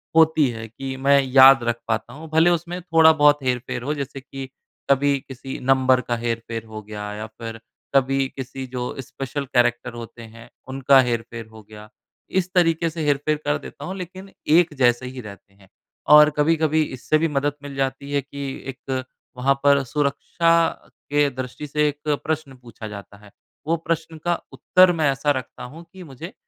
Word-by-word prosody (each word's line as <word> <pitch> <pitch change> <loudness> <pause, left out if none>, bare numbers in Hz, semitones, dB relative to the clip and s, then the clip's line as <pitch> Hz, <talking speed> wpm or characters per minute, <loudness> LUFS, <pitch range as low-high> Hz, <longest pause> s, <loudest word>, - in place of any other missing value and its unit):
होती 160 -2 +5
है 115 -1 -6
कि 130 +4 -6
मैं 140 +1 +4
याद 135 -1 +7
रख 120 0 -1
पाता 115 0 -2
हूँ 155 +3 -10
भले 160 +2 +4
उसमें 175 +1 -2
थोड़ा 165 -2 +5
बहुत 145 -2 +4
हेर-फ़ेर 125 -1 -2
हो 145 +4 -1
जैसे 140 -1 -5
कि 135 0 -8 0.4
कभी 140 +1 +3
किसी 135 0 -7
नंबर 130 -1 +3
का 120 0 -2
हेर-फेर 115 -1 -4
हो 110 -1 -8
गया 105 0 -7
या 105 +1 -6
फ़िर 115 +1 -9 0.4
कभी 135 0 +2
किसी 130 0 -6
जो 125 -1 -4 0.2
स्पेशल 135 +2 -5
कैरेक्टर 120 -2 +1
होते 120 0 -9
हैं, 115 +1 -13 0.2
उनका 135 0 +4
हेर-फ़ेर 120 -1 -3
हो 110 0 -13
गया। 105 0 -12 0.5
इस 180 0 -4
तरीके 165 -2 +2
से 160 0 -5
हेर-फ़ेर 145 +1 +1
कर 145 0 +1
देता - - -10
हूँ 190 - -5
लेकिन 185 +1 -8 0.3
एक 170 -2 +4
जैसे 120 -1 +3
ही 125 0 -7
रहते 100 -2 -12
हैं। 100 -1 -22 0.5
और 150 0 +8
कभी-कभी 155 0 +2
इससे 145 +2 -1
भी 165 +1 +1
मदद 145 0 -1
मिल 140 -1 -8
जाती 135 +1 -3
है 140 0 +1
कि 140 +1 -8 0.3
एक 130 0 -4 0.3
वहाँ 135 +2 +3
पर 140 -1 +4
सुरक्षा 150 +5 0 0.6
के 145 0 +3
दृष्टि 130 +2 -7
से 150 +1 +1
एक 145 0 -3 0.2
प्रश्न 155 -3 -3
पूछा 115 -2 -10
जाता 100 -1 -10
है। 100 - -16 0.4
वो 165 - +2
प्रश्न 165 -1 -2
का 175 0 +1
उत्तर 185 -1 +4
मैं 145 -2 +4
ऐसा 135 +2 0
रखता 125 0 -11
हूँ 155 +7 -10
कि 190 -1 -10
मुझे, 160 +3 -10
135 Hz, 180 wpm, -22 LUFS, 120-150 Hz, 0.6 s, और